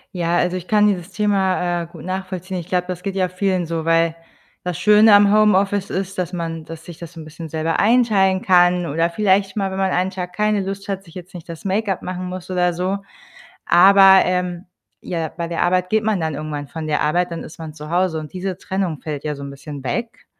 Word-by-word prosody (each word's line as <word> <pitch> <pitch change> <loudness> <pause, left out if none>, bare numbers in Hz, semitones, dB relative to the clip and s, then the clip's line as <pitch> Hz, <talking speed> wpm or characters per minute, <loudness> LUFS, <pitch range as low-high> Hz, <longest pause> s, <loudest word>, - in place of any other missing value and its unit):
Ja, 170 -1 0
also, 180 +1 0
ich 180 0 -9
kann 210 -1 +4
dieses 185 -2 -2
Thema, 190 -4 0
äh, - - -9
gut 165 -2 -12
nachvollziehen. 185 0 -4
Ich 170 - -6
glaube, 180 -1 0
das 180 -1 -5
geht 195 0 -4
ja 185 -2 +1
vielen 185 -1 -1
so, 165 -1 -3
weil 165 0 +3 0.5
das 180 -3 -2
Schöne 210 +1 +6
am 205 0 +5
Homeoffice 205 -2 +3
ist, 195 +1 -4
dass 180 0 -3
man 165 -2 -4
das 165 0 -9
sich 170 -2 -11
das 170 -1 -9
so 165 - -9
'n - - -9
bisschen 155 +1 -9
selber 160 +1 -1
einteilen 205 -5 +3
kann 180 -3 +4
oder 165 +3 0
vielleicht 195 +1 +1
mal, 195 -2 -1
wenn 190 - -5
man 190 -1 +1
einen 185 +1 +1
Tag 180 -2 -6
keine 210 +1 +1
Lust 195 +1 -6
hat, 195 0 -4
sich 165 - -16
jetzt 180 +1 -10
nicht 175 -3 -10
das 165 +1 -9
Make-up 195 -1 -1
machen 185 0 -5
muss 180 0 -7
oder 180 -1 +1
so. 185 +3 -1 0.7
Aber, 190 +2 +7
ähm, 180 0 -2 0.4
ja, 165 -3 -3
bei 170 +2 -5
der 170 - 0
Arbeit 180 0 +1
geht 220 +1 +1
man 215 -3 +1
dann 160 -1 -1
irgendwann 150 -1 -5
von 160 -1 -6
der 150 - 0
Arbeit, 175 +5 +1
dann 165 - -5
ist 155 - -12
man 160 -2 -7
zu 150 0 -9
Hause, 175 -1 +1
und 155 -1 -9
diese 185 0 -4
Trennung 185 -5 -3
fällt 150 -2 -5
ja 150 -1 -2
so 140 - -9
'n 140 - -6
bisschen 140 0 -9
weg. 230 - -4
180 Hz, 230 wpm, -20 LUFS, 165-195 Hz, 0.7 s, Aber